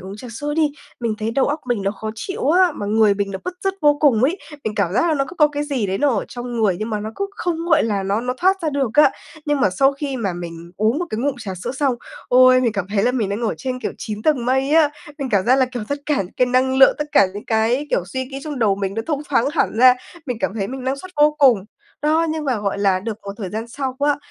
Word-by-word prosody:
uống 190 +2 -8
trà 245 +3 -9
sữa 290 +6 -4
đi, 305 -2 +2 0.3
mình 230 -2 -1
thấy 220 +1 -2
đầu 265 +3 +1
óc 295 +2 -2
mình 240 -5 -1
nó 195 - 0
khó 220 +1 -6
chịu 380 - -3
á, 360 0 +4
mà 205 - -5
người 215 -1 +3
mình 200 0 -2
nó 190 - -4
bứt 360 - -4
rứt 390 0 +1
vô 295 -1 +5
cùng 255 -7 +4
ấy. 320 +9 +2 0.3
Mình 215 - -2
cảm 195 -4 0
giác 335 - +2
là 320 - +2
nó 275 -2 +1
cứ 340 - -9
có 300 -2 +5
cái 290 0 -3
gì 270 -8 -1
đấy 190 0 -2
nó 290 - +3
ở 220 -6 -1
trong 245 0 -6
người 200 -5 +2
nhưng 215 +1 -4
mà 210 - -2
nó 215 +1 -5
cứ 400 - -1
không, 345 -2 -1
gọi 320 -2 +4
là, 205 -3 -1
nó 200 +3 0
nó 250 +1 -2
thoát 380 +4 +2
ra 315 - 0
được 275 -5 -1
á. 295 -2 +6 0.3
Nhưng 295 -2 0
mà 195 - +3
sau 270 +9 +3
khi 275 -1 -4
mà 205 -6 -2
mình 170 -1 -8
uống 220 +6 +1
một 355 - -1
cái 215 - -3
ngụm 275 +2 0
trà 205 -5 -5
sữa 180 +5 -5
xong, 270 -1 0 0.3
ôi, 255 0 +6
mình 240 -3 +1
cảm 200 -3 -3
thấy 200 -1 0
là 250 +2 +2
mình 225 -6 -1
đang 200 +3 -3
ở 225 - 0
trên, 255 -2 -4
kiểu, - - -3
9 215 -1 -5
tầng 280 -4 +2
mây 265 +2 +1
á! 315 -1 +5 0.3
Mình 275 - -3
cảm 200 -3 +2
giác 255 +3 +4
là, 260 - +3
kiểu, 250 -2 -6
rất 285 - -2
cả 295 - +1
những 180 - -11
cái 250 - +3
năng 255 +1 +2
lượng, 265 0 +7
tất 300 - -2
cả 200 - +6
những 205 - -7
cái, 230 +6 +1
kiểu, 175 - +1
suy 260 +8 -4
nghĩ 270 +1 -7
trong 295 -3 -5
đầu 210 -5 +3
mình 195 -1 -3
nó 225 - -2
thông 300 -3 -1
thoáng 250 -4 +2
hẳn 255 -8 0
ra. 255 +1 +8 0.3
Mình 250 -3 -2
cảm - - -1
thấy 200 -3 -2
mình 260 0 -6
năng 265 +1 0
suất 370 +6 -10
vô 300 0 +4
cùng. 245 -9 +5 0.4
Đó. 315 +2 +2
Nhưng 315 -1 -3
mà, 260 -5 0
gọi 200 -1 -2
là, 195 -2 +2
được 215 +1 -5
một 200 0 -6
thời 200 -4 -5
gian 225 +2 -5
sau 260 0 -4
á, 290 0 +2
250 Hz, 300 wpm, -20 LUFS, 210-290 Hz, 0.4 s, ra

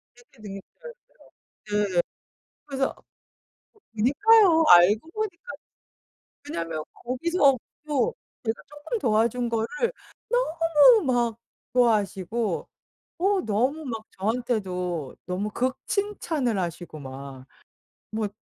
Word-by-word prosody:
되게 475 - -23
능력자였어요. 195 -2 -7 1.3
네 185 - -5
예. - - +6 0.7
그래서. 270 -1 -1 1.0
그니까요. 325 - +5
알고 200 - +6
보니까. 430 +1 -4 1.0
왜냐면 165 - -3
거기서 275 +2 +2 0.3
또 300 - +1 0.3
제가 225 -1 -2
쪼끔 295 +11 -5
도와준 235 - +1
거를 225 -1 0 1.0
너무 415 +7 +7
막 240 -3 +1 0.3
좋아하시고 215 -2 +1 0.5
어 390 +2 +2
너무 255 +9 0
막 225 -4 -4 0.2
저한테도 190 - -2
너무 190 +4 -2
극 255 +4 -1
칭찬을 325 - -1
하시고 175 -2 -4
막 135 -1 -9 0.6
뭐 215 -1 -1
235 Hz, 210 characters per minute, -26 LUFS, 195-295 Hz, 1.3 s, 너무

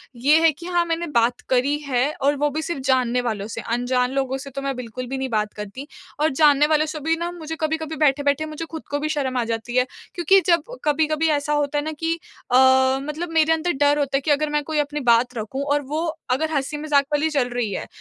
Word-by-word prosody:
ये 285 +6 +4
है 325 - +6
कि 310 +3 -12
हाँ, 350 -1 +1
मैंने 335 0 -2
बात 235 +1 +2
करी 265 +3 +2
है 250 -1 +2 0.2
और 285 +2 +3
वो 295 +1 +1
भी 310 +3 -3
सिर्फ़ 315 -4 -4
जानने 250 -2 +2
वालों 215 -4 -3
से, 230 +1 -6
अनजान 250 +2 0
लोगों 270 -1 -1
से 275 +1 -8
तो 275 +1 -6
मैं 275 -1 -2
बिल्कुल 250 0 -6
भी 265 +2 -4
नहीं 265 0 -3
बात 215 -2 -1
करती 210 +7 -8 0.3
और 310 +1 +3
जानने 295 0 +6
वालो 310 0 +2
से 310 0 -5
भी 320 +3 0
ना 345 +1 -3
मुझे 320 -2 -6
कभी-कभी 315 0 -2
बैठे-बैठे 285 -1 +2
मुझे 310 +1 -6
ख़ुद 320 -1 -6
को 290 - 0
भी 305 - -2
शर्म 270 -4 -1
आ 240 - +1
जाती 230 +1 -4
है, 250 0 +4 0.3
क्योंकि 360 +3 +5
जब 340 -3 +4 0.2
कभी-कभी 310 +1 +1
ऐसा 295 0 0
होता 295 0 0
है 290 - 0
ना 310 - -3
कि 325 0 0 0.4
अ, 250 - +4 0.5
मतलब 310 +4 -4
मेरे 320 0 +4
अंदर 325 +2 0
डर 290 +1 +3
होता 275 -1 +1
है - - -3
कि 295 - 0
अगर 300 +1 +2
मैं 295 0 0
कोई 305 +1 -2
अपनी 295 0 -1
बात 240 +2 +3
रखूँ 245 +6 -4
और 290 - +1
वो 320 +3 -1 0.2
अगर 310 +5 0
हँसी-मज़ाक 290 0 +1
वाली 300 +2 +2
चल 270 -5 0
रही 240 -4 -2
है, - - -4
290 Hz, 240 wpm, -22 LUFS, 255-310 Hz, 0.5 s, है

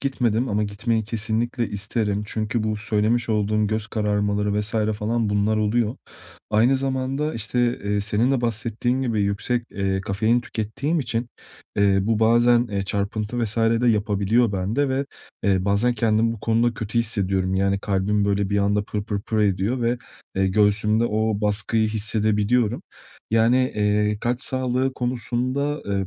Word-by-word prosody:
gitmedim 125 -3 0
ama 105 0 0
gitmeyi 110 +2 -1
kesinlikle 115 +2 -2
isterim. 105 0 -1
Çünkü 110 +1 -2
bu 110 -1 -1
söylemiş 110 +2 0
olduğum 105 0 +1
göz 110 +1 -2
kararmaları 105 -1 0
vs. 105 +1 -2 0.3
falan 115 0 0
bunlar 105 +1 +1
oluyor. 110 +3 0 0.5
Aynı 115 +5 +4
zamanda, 135 +3 -2
işte, 120 +2 0
eee, 105 0 0
senin 105 +5 +1
de 135 -3 +1
bahsettiğin 120 +3 -1
gibi 110 -5 0
yüksek, 110 +4 -1
eee, 95 -1 -1
kafein 110 +5 +1
tükettiğim 120 +9 -2
için, 120 -2 -2 0.5
eee, 100 -1 +3
bu 110 +1 0
bazen, 120 +2 +4
eee, 100 -1 -2
çarpıntı 105 +4 -2
vs. 110 +1 -3 0.2
de 125 - +3
yapabiliyor 105 +1 +2
bende 110 +10 0
ve, 135 +1 -1 0.4
eee, 95 -2 +1
bazen 105 +5 +2
kendimi 115 0 +2
bu 110 - -9
konuda 115 +1 +1
kötü 110 +2 -3
hissediyorum. 95 -4 0
Yani 100 +1 +1
kalbim 100 +1 0
böyle 100 -1 0
bir 100 - +2
anda 100 +1 +1
pır 105 -1 -4
pır 105 -2 -3
pır 110 +1 -3
ediyor 105 +4 +1
ve, 120 +1 +1 0.4
eee, 95 0 +2
göğsümde 105 +3 +2
o 110 -1 0
baskıyı 110 +1 +1
hissedebiliyorum. 110 +2 +1 0.5
Yani, 115 +2 +4 0.2
eee, 105 0 +1
kalp 120 +2 -1
sağlığı 130 -1 0
konusunda, 125 +4 -2
eee, 100 -1 -1
110 Hz, 150 wpm, -23 LUFS, 105-120 Hz, 0.5 s, Aynı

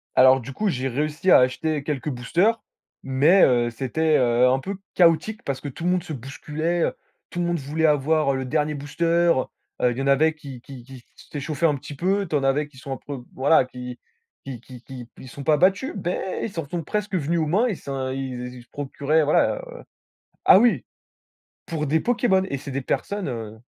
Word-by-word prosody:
Alors, 130 +1 +6
du 130 +3 -8
coup, 210 +9 -1
j'ai 135 -6 -1
réussi 150 +7 -1
à - - +9
acheter 145 +4 +1
quelques 150 -1 -3
boosters, 175 - +1 0.4
mais 145 +8 +4
heu, 120 -2 +2
c'était, 150 +6 0
heu, 125 0 +4
un 130 +1 +2
peu 195 +9 -5 0.2
chaotique 175 +5 +3
parce 140 -2 -3
que 145 - -6
tout 145 +5 -8
le 180 - +2
monde 180 -1 +1
se 155 - -7
bousculait, 150 +6 -3
heu, - - 0 0.4
tout - - -6
le 175 - 0
monde 175 0 0
voulait 150 +4 0
avoir 150 -1 +2
le 130 0 -2
dernier 150 +3 0
booster, 145 +4 -4 0.3
heu 130 - +1 0.4
heu, 125 - +3
il 120 - -7
y 135 - -1
en - - -3
avait 155 +3 +4
qui 140 -5 -10
qui 130 -1 -11
qui 130 -1 -13
s'échauffaient 150 +2 -2
un 150 -3 +2
petit 145 +2 -9
peu, 195 +6 0
tu 160 - -6
en 145 - +2
avais 135 +2 +1
qui 145 -3 -19
sont 135 +1 -7
un - - -2
peu, 140 -3 -6
voilà, 135 +2 +4
qui 125 -1 -9 0.4
qui 130 -4 -7
qui 125 -1 -13
qui 125 -2 -10
ils 130 - -11
se - - -13
sont 140 - -7
pas 155 +1 +4
battus 190 - +2
mais 180 +2 -2
ils - - -3
s'en 165 -5 -5
sont 170 +2 -3
presque 210 +5 -3
venus 170 0 0
aux 160 - 0
mains, 205 +11 +2
ils 210 - -2
s'en 135 -3 -4
heu, 130 - -3
ii 125 -2 -6
se 120 - -25
procuraient 145 +2 0
voilà, 150 - +3
heu - - -10 0.7
ah - - +8
oui! 215 - +3 0.8
Pour 155 -2 -2
des 160 +3 +2
pokémons 230 -3 +2
et 140 - -2
c'est 135 - -8
des 140 +1 -2
personnes, 200 +8 -2
heu 110 -4 -6
145 Hz, 225 wpm, -23 LUFS, 130-165 Hz, 0.8 s, à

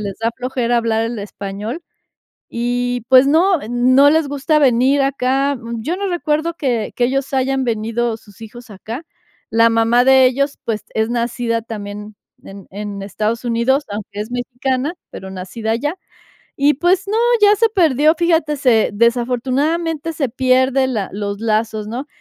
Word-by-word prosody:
les 200 -2 -5
da 225 +1 0
flojera 250 -1 -1
hablar 225 -1 +1
el 230 -1 -4
español 205 - -6 0.7
y, 245 0 -2
pues, 260 0 +7
no 340 +6 +3
no 255 +4 +5
les 320 -2 +2
gusta 285 +2 +1
venir 265 +1 +3
acá. 275 +1 0 0.2
Yo 315 +10 -2
no 400 - -2
recuerdo 330 -1 -1
que 245 -9 -2
que 240 - +2
ellos 270 +2 -2
hayan 265 0 0
venido, 230 0 -1
sus 205 -1 -19
hijos 240 +2 -11
acá. 225 - -7 0.5
La 230 0 +5
mamá 230 +2 +3
de 265 -1 +6
ellos, 280 +3 -1
pues, 215 -2 -3
es 220 +1 0
nacida 235 -1 -1
también 210 -1 -8 0.3
en 195 0 -12
en 200 0 -6
Estados 215 +4 -3
Unidos, 240 +4 +1
aunque 205 0 -6
es 220 +3 -8
mexicana, 255 +4 -2 0.2
pero 190 - -9
nacida 190 +4 -5
allá. 290 +9 -1 0.6
Y 285 +1 +3
pues, 360 +6 +1
no, 425 +2 -1 0.3
ya 415 0 +7
se 450 +2 +2
perdió, 315 - +3
fíjate, 325 -3 +1
se 245 -5 +3
desafortunadamente, 265 +8 0
se 275 -6 -2
pierde 260 +1 +2
la 220 -7 -3
los 200 0 -4
lazos, 220 -1 -1
¿no? 250 +6 -5
245 Hz, 155 wpm, -18 LUFS, 225-280 Hz, 0.7 s, pues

